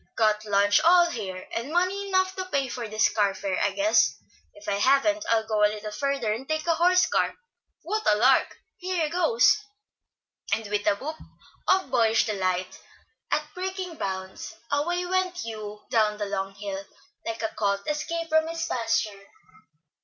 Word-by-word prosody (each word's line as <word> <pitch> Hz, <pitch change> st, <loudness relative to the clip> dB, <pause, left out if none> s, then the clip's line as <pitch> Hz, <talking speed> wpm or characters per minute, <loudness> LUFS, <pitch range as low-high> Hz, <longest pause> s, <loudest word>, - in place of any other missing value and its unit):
Got 215 Hz, -1 st, +2 dB
lunch 205 Hz, 0 st, +3 dB
all 345 Hz, +1 st, +6 dB
here, 190 Hz, -5 st, -6 dB
and 235 Hz, +6 st, -3 dB
money 370 Hz, +4 st, 0 dB
enough 375 Hz, -1 st, +1 dB
to 375 Hz, -, -3 dB
pay 280 Hz, -7 st, -1 dB
this 225 Hz, -3 st, 0 dB
car 205 Hz, -2 st, +1 dB
fare, 195 Hz, -2 st, -2 dB
I 205 Hz, -, +2 dB
guess. 305 Hz, +10 st, +3 dB, 0.4 s
If 310 Hz, -, -14 dB
I 200 Hz, 0 st, 0 dB
haven't, 280 Hz, +6 st, +3 dB
I'll 225 Hz, -1 st, +2 dB
go 215 Hz, -1 st, +1 dB
a 210 Hz, -, +6 dB
little 210 Hz, 0 st, -6 dB
further 245 Hz, -1 st, -1 dB
and 260 Hz, +6 st, -7 dB
take 310 Hz, 0 st, -1 dB
a 335 Hz, -, +3 dB
horse 360 Hz, +3 st, +4 dB
car. -, -, 0 dB, 0.5 s
What 430 Hz, -, +1 dB
a 210 Hz, -, +3 dB
lark! 255 Hz, +5 st, +3 dB, 0.2 s
here 360 Hz, -3 st, -1 dB
goes," 320 Hz, -, +4 dB, 0.9 s
and 220 Hz, +2 st, 0 dB
with 210 Hz, 0 st, -1 dB
a 205 Hz, -, +4 dB
whoop 305 Hz, +9 st, -6 dB, 0.5 s
of 375 Hz, 0 st, +2 dB
boyish 225 Hz, -1 st, +3 dB
delight 185 Hz, -3 st, -2 dB, 0.5 s
at 300 Hz, 0 st, -1 dB
breaking 370 Hz, -2 st, -5 dB
bounds, 190 Hz, +2 st, -5 dB, 0.2 s
away 345 Hz, +5 st, 0 dB
went 370 Hz, 0 st, 0 dB
Hugh 215 Hz, -5 st, -7 dB
down 215 Hz, -2 st, +2 dB
the 210 Hz, -, -2 dB
long 195 Hz, -1 st, -3 dB
hill, 195 Hz, -1 st, -5 dB, 0.4 s
like 225 Hz, 0 st, -4 dB
a 220 Hz, -, 0 dB
colt 200 Hz, -2 st, -1 dB
escaped 330 Hz, +2 st, -3 dB
from 315 Hz, 0 st, +3 dB
its 330 Hz, 0 st, -3 dB
pasture. 220 Hz, -4 st, -1 dB
230 Hz, 170 wpm, -26 LUFS, 210-330 Hz, 0.9 s, all